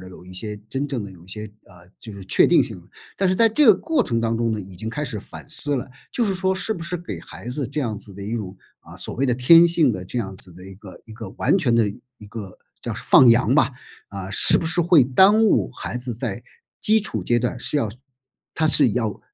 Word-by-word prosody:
的 95 - -12
有 90 -1 -15
一 90 - -13
些 105 +3 -5
真 135 +5 -4
正 125 -7 -4
的 100 - -11
有 85 -2 -17
一 90 - -20
些， 105 +2 -6 0.2
呃， 90 -2 -19
就 110 - -10
是 100 -1 -11
确 - - +3
定 - - +4
性。 - - -6 0.4
但 190 -1 +1
是 185 - +1
在 230 -1 +3
这 285 +5 +3
个 215 - +7
过 315 - -1
程 115 - -2
当 115 0 -1
中 115 0 -1
呢， 110 - -3
已 95 -2 -10
经 110 +5 -6
开 145 +6 -4
始 115 -7 -5
反 - - -11
思 145 -1 +8
了。 125 0 -6 0.2
就 240 - -1
是 195 -2 -2
说 190 0 -1
是 190 +4 -1
不 175 - -8
是 175 +2 -4
给 175 +1 -8
孩 - - -13
子 130 -1 -3
这 145 +2 -4
样 110 -5 -4
子 100 -2 -3
的 100 - -10
一 105 - -6
种， 100 -4 -6 0.2
啊， - - -15
所 - - -5
谓 135 +3 -1
的 125 - 0
天 165 +7 +6
性 160 -7 +3
的 95 - -6
这 95 +7 -5
样 95 -4 -5
子 90 -2 -4
的 90 - -14
一 95 0 -12
个 95 -2 -14
一 110 - -14
个 110 -3 -9
完 - - +1
全 125 -9 0
的 115 -2 +2 0.3
一 105 - -15
个 100 -3 -10 0.2
叫 - - -5
放 125 - +4
羊 115 +1 +3
吧， 140 -3 +2 0.4
啊， 95 -1 -8
是 - - +6
不 - - -3
是 175 +2 0
会 165 -6 +4
耽 190 - +4
误 215 - +1
孩 125 - -6
子 120 -1 -4
在 120 -1 -4 0.4
基 220 +1 +5
础 210 - -5
阶 120 - 0
段 120 0 -4
是 - - -1
要 115 -8 -1 0.6
他 160 - 0
是 140 -7 +3
要 110 -4 -3
120 Hz, 280 characters per minute, -21 LUFS, 105-160 Hz, 0.6 s, 思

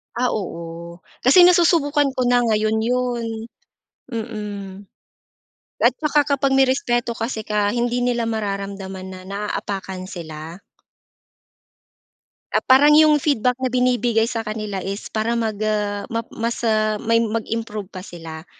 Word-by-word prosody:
Ah, 250 +1 +1
oo, 170 -3 -6 0.2
kasi 280 +9 +7
nasusubukan 330 -5 +4
ko 255 - 0
na 245 0 +4
ngayon 220 -2 +1
'yon, 245 0 0 0.9
mm. 205 -4 -6 1.0
At 235 - +7
saka 300 -1 +2 0.2
kapag 270 0 +1
may 270 -1 +4
respeto 240 -3 0
kasi 225 -1 -3
ka 210 -1 0
hindi 240 0 0
nila 240 -2 0
mararamdaman 195 -3 -4
na 185 0 -9
naapakan 195 -1 -4
sila. 165 -1 -8 1.9
Ah, - - +3
parang 285 +3 +6
'yong 305 0 +6
feedback 250 -4 +1
na 260 -1 -2
binibigay 245 -2 +2
sa 225 -2 -3
kanila 215 -2 -4
is 195 +1 -5
para 220 +2 -1
mag 225 -3 -1
ah, 205 -1 -1
map 230 0 -3
mas 230 +1 -3
ah, 215 -2 +1
may 230 0 +2
mag-improve 220 -2 -3
pa 185 -2 -9
sila. 165 -3 -9
225 Hz, 130 wpm, -21 LUFS, 200-245 Hz, 1.9 s, kasi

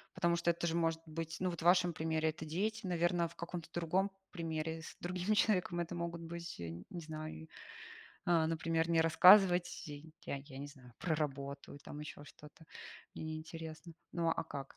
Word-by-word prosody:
потому 170 -2 +3
что 170 - +1
это 170 0 -3
же 165 - +1
может 165 -1 +1
быть 165 +1 -4
ну, 185 0 +1
вот 170 - -6
в - - -6
вашем 180 -1 +5
примере 160 0 +1
это 160 +1 -5
дети, 205 +7 -1
наверно, 175 0 +2
в 165 - -15
каком-то 170 -1 -5
другом 175 +4 +1 0.2
примере, 160 -2 -3
с - - -9
другим 180 +4 0
человеком, 180 -5 +2
это 170 +1 -4
могут 170 0 -3
быть, 170 - -6
э, 85 0 -6
не 175 - -6
знаю, 155 - -6 0.8
а, 165 -2 +4
например, 165 0 +1
не 165 -1 +4
рассказывать 180 +2 +7
я 150 +1 -7
я 135 -1 -9
не 145 +1 -5
знаю, 130 -4 -14
про 165 -3 0
работу, 140 -1 -3
или - - -9
там 145 - -9
ещё 150 -1 -7
что-то, 150 +3 -14 0.5
мне - - -4
неинтересно. 160 +1 -6 0.2
Ну 170 -1 +1
а 165 - 0
как? 140 -3 -7
165 Hz, 185 wpm, -36 LUFS, 155-175 Hz, 0.8 s, рассказывать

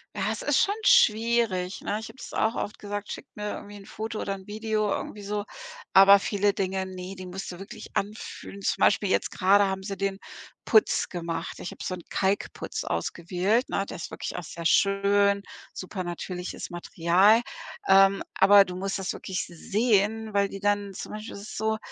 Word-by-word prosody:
Ja, - - -1
es - - -4
ist - - +3
schon 405 - 0
schwierig, 225 - +3
ne? 205 +1 -2
Ich 220 - -7
habe - - -14
das - - -9
auch 225 - +1
oft 210 - -4
gesagt: 205 0 -5
„Schickt - - -9
mir 210 0 -4
irgendwie 205 0 -10
'n 195 - -13
Foto 220 0 -5
oder 195 - -2
'n 190 -1 -12
Video 215 0 -1
irgendwie 205 +1 -4
so“, 205 +1 -2 0.5
aber 195 +1 +9
viele 205 0 +1
Dinge, 190 0 -1
ne, 185 0 -7
die 185 -1 -8
musst 185 +1 -6
du 175 - -8
wirklich 195 +2 -10
anfühlen. 200 -1 -5
Zum - - -1
Beispiel 200 -1 +3
jetzt - - +1
grade 200 +2 +4
haben 190 0 -2
sie 195 0 -5
den 195 0 -2 0.5
Putz 220 -2 +3
gemacht. 170 -2 -4
Ich - - -6
hab - - -12
so 185 - -3
'n 175 - -11
Kalkputz 195 +1 -1
ausgewählt, 185 +8 -1
ne? 195 - -1
Der - - -7
ist 170 - -7
wirklich - - -5
auch 180 - -4
sehr 170 +1 -8
schön, 200 +1 +3 0.3
supernatürliches 180 -1 -5
Material. 175 +5 +3 0.5
Ähm, 195 0 +6 0.2
aber 200 0 +8
du 180 - -7
musst 195 +1 -3
das 190 - -2
wirklich 190 -1 -4
sehen, 215 +4 0
weil 200 0 +3
die 195 - -8
dann 205 0 0
zum - - -7
Beispiel 215 +1 -7
ist 200 - -8
es - - -8
so, 220 0 0
200 Hz, 190 wpm, -27 LUFS, 190-210 Hz, 0.5 s, aber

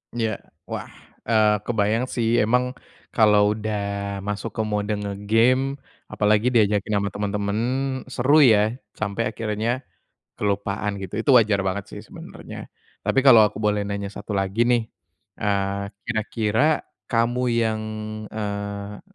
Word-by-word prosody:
Iya. 115 -2 0 0.4
Wah, - - -4 0.4
eee, 110 -2 +4
kebayang 110 +1 +1
sih 115 -2 0 0.2
emang 125 +3 +3 0.5
kalau 105 -2 +5
udah 110 0 -3 0.5
masuk 105 +2 -3
ke - - 0
mode 105 0 -1
nge-game 115 +7 +2 0.4
apalagi 105 +2 +2
diajakin 105 -2 +2
sama 100 0 0
temen-temen 100 +1 -2 0.5
seru 130 +4 +3
ya, 110 -8 +6 0.3
sampai 105 +2 -2
akhirnya 115 +3 -2 0.5
kelupaan 100 0 -1
gitu. 95 -2 -7
Itu 135 - +2
wajar 105 -3 +3
banget 95 +1 -1
sih - - -8
sebenarnya. - - -10 0.3
Tapi - - +2
kalau 120 -5 +9
aku 105 -2 +2
boleh 105 0 +2
nanya 100 0 -3
satu 105 +1 -6
lagi 95 +3 0
nih, 120 -1 +4 0.6
eee, 100 -1 0 0.2
kira-kira 110 0 -1 0.5
kamu 120 +1 +1 0.2
yang, 110 -1 0 0.5
eee, 100 -1 -5
105 Hz, 125 wpm, -23 LUFS, 100-115 Hz, 0.6 s, kalau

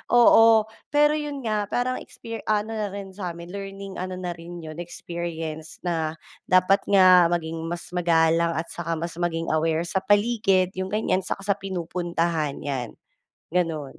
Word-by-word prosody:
Oo. 225 -2 +7 0.2
Pero 295 0 +4
yun 295 -3 -3
nga, 210 -2 -1
parang 255 +3 -1
exper 230 -1 -8
ano 215 +1 +1
na 215 -2 -2
rin 195 -1 -7
samin 175 -3 -7
learning 195 -1 -7
ano 185 0 -4
na 180 -1 -4
rin 170 0 -9
yun 155 +1 -8
experience, 165 -2 -6
na 165 -2 -1 0.3
dapat 185 +2 +4
nga 185 -3 +7
maging 165 -1 -2
mas 175 +1 -5
magalang, 170 -1 +2
at 160 +1 -3
saka 170 -1 -3
mas 165 +1 -4
maging 165 -1 -1
aware 160 +1 +1
sa 190 +2 -1
paligid, 205 -3 +2
yung 185 - -2
ganyan, 195 -2 0
'saka 195 +1 -4
sa 200 0 0
pinupuntahan 170 -4 -2
yan, 130 -5 -3 0.6
ganun. 160 -5 -2
180 Hz, 155 wpm, -25 LUFS, 165-200 Hz, 0.6 s, Oo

